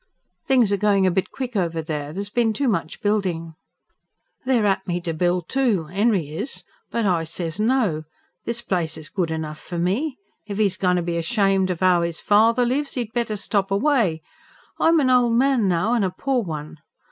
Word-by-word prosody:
"Things 245 -6 +4
are - - +2
going 200 -1 +3
a 185 - +3
bit 190 +1 -1
quick 255 -3 -6
over 170 -4 0
there. 150 -2 -4
There's 200 +4 -5
been 230 -1 +2
too 275 +6 -1
much 170 -8 -2
building." 185 -6 -1 0.9
"They're 245 -5 +3
at 195 -1 0
me 175 -1 -1
to 170 -1 -3
build, 175 +1 0
too 225 - 0
'Enry 195 -5 +1
is. 160 - -4 0.3
But 230 -2 -1
I 175 -4 +2
says 165 +2 -4
no. 215 -9 +1 0.4
This 235 0 -3
place 170 -6 -1
is 155 -1 -6
good 180 -4 -1
enough 155 -1 -4
for 175 - -7
me. 215 - -1 0.3
If 205 0 -4
'e's 200 -4 +2
goin' 180 -1 +2
to 175 - 0
be 170 0 -2
ashamed 195 0 +1
of 180 0 -2
'ow 180 -2 +4
'is 170 -1 -2
father 225 +4 +4
lives, 275 +3 -1
'e'd 230 -3 -3
better 235 -3 -1
stop 200 -1 -1
away. 200 - +1 0.6
I'm 330 0 +4
an 260 -3 +3
ol' 250 -1 +4
man 245 -2 +3
now, 185 +6 +1
an' 235 -4 +2
a 190 - +1
poor 255 +7 -1
one. 155 -5 -6
195 Hz, 195 wpm, -22 LUFS, 170-235 Hz, 0.9 s, Things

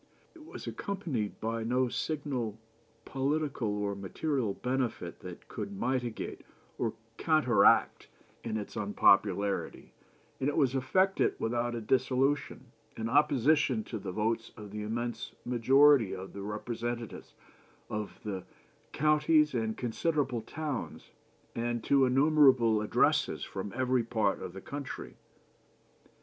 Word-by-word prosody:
It 330 -3 -14
was 315 - -9
accompanied 160 - -3
by 115 +1 -2
no 125 +3 +1
signal 130 -5 -3 0.5
political 140 -2 -1
or 105 -1 -1
material 105 - -2
benefit 125 -9 -2
that 90 -1 -10
could 200 - -5
mitigate 130 - -3 0.4
or 115 -1 -1 0.2
counteract 155 -8 +3 0.4
its 110 -2 -4
unpopularity, 100 -1 +2 0.5
and 135 - +1
it 145 - -3
was 135 -5 +3
effected 185 +9 +2
without 120 +1 -1
a 115 - -4
dissolution, 130 +4 0 0.3
in 115 0 -2
opposition 145 -3 +3
to 110 - -6
the 95 -2 -5
votes 110 +3 -1
of 105 -2 -9
the 105 +1 -5
immense 120 +3 -4
majority 125 -2 +5
of 95 +1 -8
the 100 - -7
representatives 115 +3 -5 0.5
of 105 -1 -5
the 95 -4 -4 0.5
counties 150 0 +3
and 110 -2 -1
considerable 130 0 -1
towns, 145 +3 -5 0.4
and 120 -1 -2
to 140 -1 +4
innumerable 130 -5 +4
addresses 105 - +2
from 95 +1 -5
every 130 -1 +1
part 110 -3 0
of 90 - -6
the 95 - -8
country. 140 +4 -7
120 Hz, 120 wpm, -30 LUFS, 110-140 Hz, 0.5 s, majority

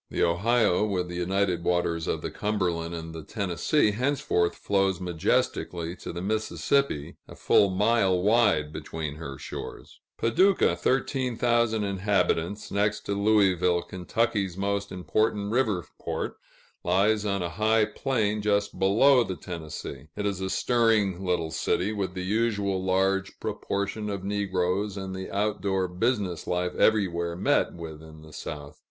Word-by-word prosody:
The - - 0
Ohio, 100 +3 +2
with 90 -4 -1
the 90 - -6
united 90 0 0
waters 85 -2 0
of - - -2
the - - -3
Cumberland 90 -5 -1
and 80 0 -7
the 80 - -6
Tennessee, 100 - +1
henceforth 125 -7 0
flows 95 -2 +1
majestically 85 -1 -1
to - - -7
the 85 +1 -5
Mississippi, 110 - 0
a - - -11
full 100 - +4
mile 95 -1 +2
wide 100 -7 +3
between 75 -1 -5
her 70 -4 -7
shores. 70 - -8 0.2
Paducah 180 - +3
(13,000 120 0 +1
inhabitants), 100 -1 0
next 105 +1 +1
to 100 - -3
Louisville 95 -4 +3
Kentucky's 95 +1 -1
most 100 +1 -1
important 100 +2 0
river 110 -8 +1
port, - - -3 0.5
lies 105 +3 +2
on 100 -3 -1
a 85 - -2
high 110 +4 +2
plain 105 -2 -1
just 100 -1 0
below 120 +7 +5
the 95 - -4
Tennessee. 80 -5 -7
It 105 - -3
is 100 -2 -1
a 95 - -2
stirring 110 -6 +2
little 90 -3 -1
city, 95 +7 0
with 95 -3 -3
the 90 0 -3
usual 100 -2 0
large 95 +1 0
proportion 100 +2 -3
of 100 -2 -4
negroes, 100 0 -1
and 95 -1 -5
the 95 0 -6
out 105 +1 -1
door 95 -2 0
business 95 -2 -1
life 90 0 -1
everywhere 85 -6 +2
met 90 - +1
with 80 -3 -8
in 80 -1 -13
the 80 -1 -14
South. 75 0 -7
95 Hz, 145 wpm, -27 LUFS, 90-105 Hz, 0.5 s, below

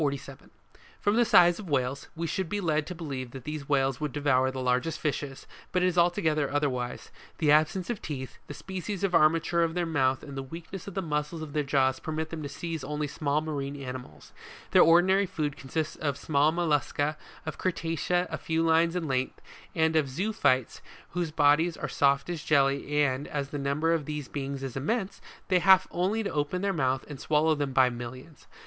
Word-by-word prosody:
From 205 +1 +1
the 240 +1 +4
size 175 -4 +6
of 195 -5 -8
Whales, 135 -1 -1
we 165 +1 -3
should 180 +1 -2
be 205 - -1
led 155 -5 0
to 180 - -6
believe 135 -6 -5
that 135 -2 -8
these 150 +1 -4
animals 135 -2 +2
would 150 -2 -1
devour 130 -2 +2
the 130 0 -5
largest 130 +5 0
fishes, 145 -2 -3 0.3
but 180 0 +1
it - - +4
is 180 -1 +1
altogether 170 -4 +2
otherwise; 130 -4 -2 0.3
the 150 -3 +3
absence 155 +5 +3
of 225 - -5
teeth, 130 -4 -6
the - - -7
species 190 +1 -5
of 195 -2 +1
armature 165 +1 +3
of 165 0 +1
their 175 -1 0
mouth 135 -5 +1
and 140 - -8
the 135 - -3
weakness 165 +7 -8
of 200 - -7
the 190 - -1
muscles 150 +1 -2
of 150 -2 -8
their 150 - +1
jaws 135 -2 +1
permit 160 0 -4
them 165 -2 -5
to 145 - -5
seize 160 +1 -5
only 150 +2 -2
small 145 +1 -1
marine 145 -3 -4
animals; 125 - -8 0.4
their - - +7
ordinary 185 +4 +5
food 150 -5 -2
consists 155 +4 -3
of 145 -3 -2
small 150 +1 +2
moliusca, 150 -2 0 0.3
of 155 - -5
Crustacea 175 0 0
a - - -3
few 160 0 0
lines 165 +1 +3
in 170 -3 -2
length, 130 -1 -1 0.4
and 160 -1 +2
of 150 -4 +2
zoophytes 140 - 0 0.3
whose 175 -2 -1
bodies 155 +2 +3
are - - -3
soft 140 0 +2
as 170 -4 -4
jelly, 140 0 +2
and, 135 0 -1
as 140 -2 -3
the 145 - -4
number 145 +4 +1
of 160 -3 -1
these 150 -2 -4
beings 140 -1 -4
is 130 -2 -5
immense, 195 - -2 0.3
they 185 -2 +4
have 190 +1 +6
only 195 +6 0
to 200 - -3
open 150 +5 -1
the 200 -1 +1
mouth 130 -4 0
to 145 - -7
swallow 155 +1 +2
them 145 -2 -2
by 130 -1 +5
millions. 125 +5 -8
150 Hz, 200 wpm, -28 LUFS, 140-170 Hz, 0.4 s, their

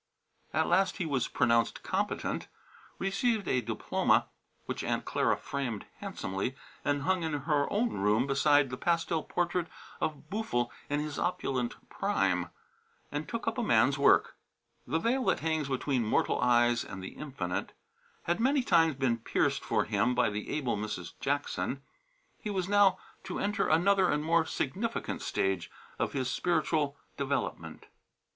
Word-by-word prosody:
At - - +2
last 190 -2 +2
he 175 - -1
was 135 -6 0
pronounced 115 -1 +2
competent, - - -2 0.5
received 200 +2 0
a 125 - +2
diploma 110 -1 +1 0.4
(which - - -4
Aunt - - -1
Clara - - +1
framed 130 -7 -4
handsomely 95 +7 -3 0.3
and 145 -1 0
hung 185 +1 +1
in 160 -2 -2
her 145 -2 +1
own 230 +4 +2
room 105 - +2
beside 140 0 +3
the 125 - -4
pastel 170 0 +1
portrait 175 +1 -1 0.3
of 155 -1 -3
Boo'ful 120 - -1 0.2
in 145 0 +1
his 150 -1 -4
opulent 130 -8 -2
prime) - - 0 0.6
and - - -4
took - - -4
up - - 0
a - - 0
man's - - +3
work. - - +4 0.5
The 150 +6 +1
veil 240 +9 +1
that - - +2
hangs 160 -3 0
between 130 -1 0
mortal 110 - +1
eyes 120 -1 +4
and 95 -1 -8
the 95 - -5
Infinite 125 -12 -4 0.5
had 175 +4 0
many 265 +3 +3
times 165 - +4
been 130 -3 +1
pierced 115 - +1
for - - +1
him 125 - +1
by - - +3
the 105 +1 -4
able 135 -7 0
Mrs. 105 -5 -5
Jackson. 140 -1 -1 0.6
He 215 - -5
was 190 -3 -1
now 205 -1 +5 0.3
to - - -4
enter 205 +1 0
another 185 +4 +4
and 150 0 +1
more 165 0 +3
significant 200 - -2
stage 95 -3 -1 0.3
of - - -1
his 130 -2 -1
spiritual 155 -1 0 0.2
development. 140 0 -3
145 Hz, 150 wpm, -30 LUFS, 125-175 Hz, 0.6 s, now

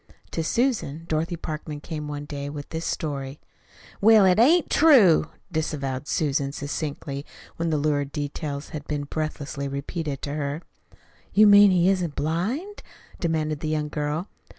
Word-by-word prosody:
To 165 - -2
Susan, 185 - 0
Dorothy 165 +2 -1
Parkman 155 -2 -5
came 150 -1 -6
one 145 0 -5
day 145 -1 -5
with 145 -1 -7
this 160 +1 -4
story. 140 -3 -3 0.6
"Well, 215 -1 +7
't 185 +3 +5
ain't 325 +7 +5
true," 230 - +6 0.2
disavowed 145 -4 -2
Susan 140 -2 0
succinctly 145 -1 -4 0.3
when 165 0 -1
the 155 - +1
lurid 145 -1 0
details 145 0 -4
had 150 -2 -7
been 145 -1 -2
breathlessly 145 -1 -4
repeated 140 +1 -4
to 140 - -3
her. 145 +2 -3 0.7
"You 215 +2 +7
mean 205 0 +8
he 180 -1 +3
isn't 180 -6 +1
blind?" 210 - -2 0.4
demanded 155 -3 -1
the 155 - -3
young 150 -1 -1
girl. 150 +5 -2
155 Hz, 150 wpm, -25 LUFS, 145-175 Hz, 0.7 s, mean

